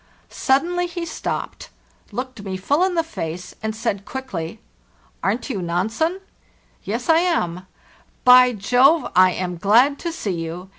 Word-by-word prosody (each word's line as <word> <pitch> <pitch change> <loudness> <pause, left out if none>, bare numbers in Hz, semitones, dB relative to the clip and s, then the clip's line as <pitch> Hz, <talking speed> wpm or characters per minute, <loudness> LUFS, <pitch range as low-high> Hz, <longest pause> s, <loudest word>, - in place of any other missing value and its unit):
Suddenly 350 +7 +1
he 345 0 -5
stopped, 320 - -5 0.4
looked 250 +1 -5
me 190 -2 -4
full 285 - +1
in 370 -1 +1
the 330 - +2
face, 180 - -6
and 220 0 -3
said, 220 -3 -2
quickly: 195 -11 -5
ve 220 - -21 0.7
Arent 215 +5 -1
you 200 -6 -3
Nansen: 220 - -1 0.7
we 200 - -2
Ves 240 +2 -3
lam. 320 - +1 0.3
"« - - -33
By 250 0 +8
Jove! 250 +9 +3
I 185 0 +7
am 180 -1 -3
glad 240 - +4
to 340 - -3
see 225 -11 -3
you! 175 +3 -7
235 Hz, 155 wpm, -21 LUFS, -, 0.7 s, By